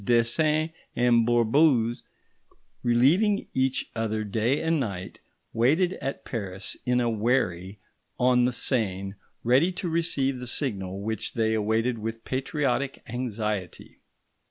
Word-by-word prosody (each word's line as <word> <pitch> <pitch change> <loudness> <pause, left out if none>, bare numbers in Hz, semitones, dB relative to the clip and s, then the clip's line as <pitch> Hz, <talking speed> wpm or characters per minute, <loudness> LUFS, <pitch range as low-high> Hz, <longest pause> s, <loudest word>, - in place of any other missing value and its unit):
Desains 150 +8 +2 0.2
and 120 -1 +3
Bourbouze, 120 0 +3 0.8
relieving 155 - +3
each 130 0 0
other 110 -1 -1
day 115 +6 0
and 160 -1 +1
night, 95 -8 -5 0.3
waited 155 +11 +2
at 135 - -4
Paris, 95 -5 -2
in 125 0 +3
a 120 - +1
wherry 105 -5 0 0.4
on 125 0 +4
the 125 - +1
Seine, 100 -6 -1 0.3
ready 130 +10 +4
to 180 - -4
receive 145 -6 0
the 125 - -6
signal 100 -8 -2
which 110 -1 -3
they 110 -1 +1
awaited 110 +2 0
with 115 +1 -5
patriotic 135 0 -1
anxiety. 105 -6 -4
120 Hz, 120 wpm, -26 LUFS, 110-135 Hz, 0.8 s, on